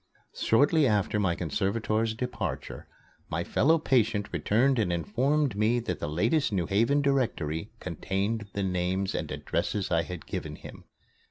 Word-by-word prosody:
Shortly 145 +5 +3
after 105 -1 +1
my 90 -4 +1
conservator's 110 +5 -1
departure, 125 +2 -4 0.4
my - - -1
fellow 160 +4 +3
patient 115 -8 +1
returned 115 - +2
and 100 -5 +1
informed 125 - +1
me 110 +4 +2
that 90 -6 -3
the 75 - -3
latest 115 - +1
New 90 -4 0
Haven 115 - +2
Directory 110 - 0
contained 100 +5 -2
the 100 - -1
names 95 +1 -1
and - - -3
addresses 100 -3 -2
I 85 -1 +3
had 90 -1 -7
given - - -5
him. - - -12
105 Hz, 145 wpm, -28 LUFS, 90-125 Hz, 0.4 s, Shortly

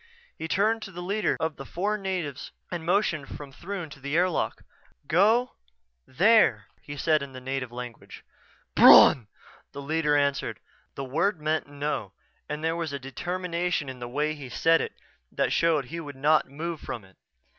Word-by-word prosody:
He 160 - -5
turned 215 +6 +1
to 195 - -7
the 175 0 -7
leader 205 +4 0
of 160 -1 -2
the 135 - -7
four 195 +9 -2
natives 185 -9 -4 0.2
and 175 -2 -4
motioned 170 -5 +1
from 145 -2 -9
Throon 180 +4 -6
to 140 - -11
the 140 +4 -2
airlock. 180 -1 0 0.4
"Go 220 - +3 0.5
there," 165 - +4 0.2
he 145 0 -8
said 155 0 +2
in 140 -1 -7
the 130 - -7
native 130 -1 -4
language. 120 -1 -9 0.5
"Bron!" 120 -6 +8 0.5
the - - -7
leader 150 0 +1
answered. 140 -1 0 0.4
The 135 - -4
word 160 +8 0
meant 155 0 -1
"No" 145 +1 -3 0.4
and 150 +1 -4
there 165 0 +1
was 165 -3 -3
a 140 - -3
determination 175 +3 -2
in 130 -1 -8
the 120 0 -6
way 150 +4 0
he 140 -4 -9
said 165 +6 +3
it - - -4 0.4
that - - 0
showed 160 -5 +2
he 165 +7 -6
would 145 -4 -8
not 150 +2 +3
move 160 +3 -5
from 115 -6 -6
it. 95 - -22
155 Hz, 175 wpm, -27 LUFS, 140-175 Hz, 0.5 s, Bron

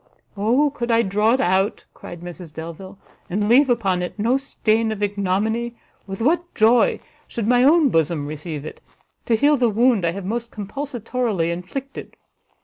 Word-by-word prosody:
"O 245 +9 +2
could 240 -3 -4
I 230 0 +4
draw 210 +3 +2
it 260 - +1
out," 190 -2 +1
cried 175 -1 -10
Mrs 175 -1 -9
Delvile, 170 +5 -9 0.3
"and 205 +3 -1
leave 260 +5 +5
upon 195 -7 +1
it 180 - -5
no 230 +5 +2
stain 225 -4 0
of 210 -1 -4
ignominy, 205 +4 -1 0.3
with 195 +3 -5
what 345 +5 0
joy 230 +2 +4 0.3
should 225 -3 -4
my 245 +1 +4
own 305 +1 +5
bosom 160 -5 0
receive 150 0 -6
it, - - -9 0.5
to 230 - +3
heal 290 +5 +3
the 245 -2 +2
wound 230 -1 +2
I 170 0 +1
have 195 0 -6
most 235 +3 -3
compulsatorily 230 - -3
inflicted! 260 +11 -7
220 Hz, 165 wpm, -21 LUFS, 185-245 Hz, 0.5 s, leave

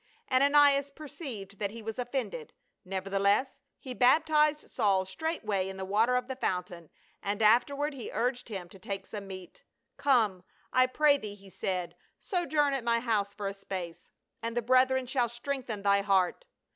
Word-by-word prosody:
Ananias 280 +1 +5
perceived 265 - -8
that 200 - -1
he 225 +2 -9
was 225 +2 -5
offended, 270 - -4 0.3
neverthe 195 +1 -3
less 205 +7 +2 0.2
he 255 - -7
baptized 300 +4 +3
Saul 190 -2 +1
straightway 205 - -2
in 190 - -7
the 190 - -4
water 220 +6 +2
of 250 0 0
the 260 - -4
fountain, 180 - -3 0.3
and 200 +1 -2
afterward 280 +7 +3
he 260 -4 -7
urged 245 0 -1
him 190 -5 -5
to 190 - -14
take 195 +1 -5
some 205 -2 -7
meat. 185 -2 -10 0.2
" - - -53
Come, 220 -10 +2 0.3
I 255 0 +5
pray 285 +2 +3
thee," 210 -3 -7
he 195 -1 -16
said, 180 -1 -3
" - - -46
sojourn 300 -6 +1
at 270 -3 -2
my 235 0 +2
house 210 -4 0
for 205 -1 -4
a 195 - -3
space, 185 -4 -7 0.3
and 230 +1 -4
the 240 - +1
brethren 255 +2 +3
shall 245 -2 0
strengthen 240 -3 -4
thy 200 0 +4
heart." 195 - +1
230 Hz, 175 wpm, -30 LUFS, 195-270 Hz, 0.3 s, Ananias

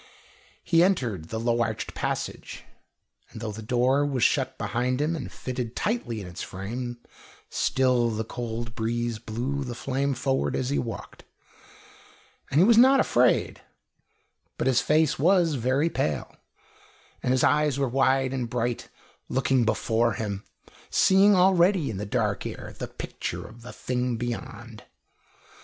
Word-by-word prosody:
He 165 -1 +4
entered 120 - 0
the 110 - -3
low 120 +1 +1
arched 110 -1 -2
passage, - - -4 0.7
and - - -10
though 110 -1 -4
the 110 +2 -8
door 125 +5 +2
was 135 -5 0
shut - - +1
behind 125 +2 -1
him 155 +3 0
and 150 - -6
fitted 125 -2 -5
tightly 170 - -2
in 100 - -7
its 90 0 -8
frame, 120 +6 -5 0.5
still 125 -3 +2
the 110 0 -2
cold 115 0 -5
breeze 115 0 -2
blew 125 +5 -3
the 125 -2 -6
flame 135 +2 -1
forward 135 +2 0
as 130 +1 -1
he 145 - +1
walked. 115 - -7 1.3
And 140 - +2
he 180 - +7
was 230 +1 +6
not 265 +2 +7
afraid; 125 - +2 1.0
but - - -1
his 130 -1 +3
face 155 +2 +2
was 175 0 +4
very 130 +4 +1
pale, 75 -3 -2 0.9
and 125 - 0
his 130 - +2
eyes 150 -2 +3
were 140 -1 +1
wide 130 +1 +2
and 125 -3 -2
bright, 120 0 -2 0.4
looking 130 -2 +2
before 110 +1 +1
him, 100 -1 -4 0.5
seeing 195 +2 +5
already 180 - +4
in 100 - -5
the 105 +1 -4
dark 105 -2 0
air - - -8
the - - -3
picture - - -6
of 115 +2 -14
the 125 - -9
thing 125 -1 -2
beyond. 115 -1 -6
125 Hz, 150 wpm, -26 LUFS, 115-140 Hz, 1.3 s, he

